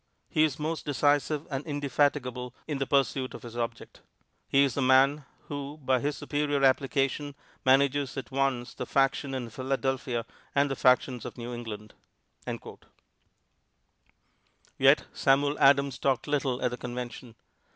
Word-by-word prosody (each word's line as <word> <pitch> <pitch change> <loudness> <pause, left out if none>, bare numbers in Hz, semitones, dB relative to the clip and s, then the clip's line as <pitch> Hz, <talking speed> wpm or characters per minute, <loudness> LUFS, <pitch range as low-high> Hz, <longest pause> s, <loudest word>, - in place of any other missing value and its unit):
He 155 - +3
is 150 -4 +1
most 155 +1 -3
decisive 145 +1 +1
and 135 +1 -2
indefatigable 140 -4 -1
in 145 -3 -2
the 135 - -1
pursuit 135 -2 +1
of - - -10
his 120 -1 -9
object. 115 -1 -5 0.5
He 140 0 +4
is 135 -3 +1
the 140 - -1
man 135 +3 +4 0.2
who, 145 0 -6
by 130 -3 +1
his 145 +3 -2
superior 145 -1 -1
application, 135 +1 +1 0.3
manages 140 +1 +3
at 130 -2 -6
once 130 -2 -1
the 125 - -6
faction 135 0 +1
in 120 -3 -5
Philadelphia 130 -1 -2 0.3
and 140 0 +3
the - - -1
factions 125 -1 +2
of - - -8
New 120 0 -6
England." 110 -3 -7 2.9
Yet - - +5
Samuel 145 +2 +2
Adams 140 -1 +4
talked 135 -2 +1
little 140 -4 -1
at 125 - +1
the 125 - -5
Convention. 125 -1 -7
135 Hz, 140 wpm, -28 LUFS, 125-145 Hz, 2.9 s, Yet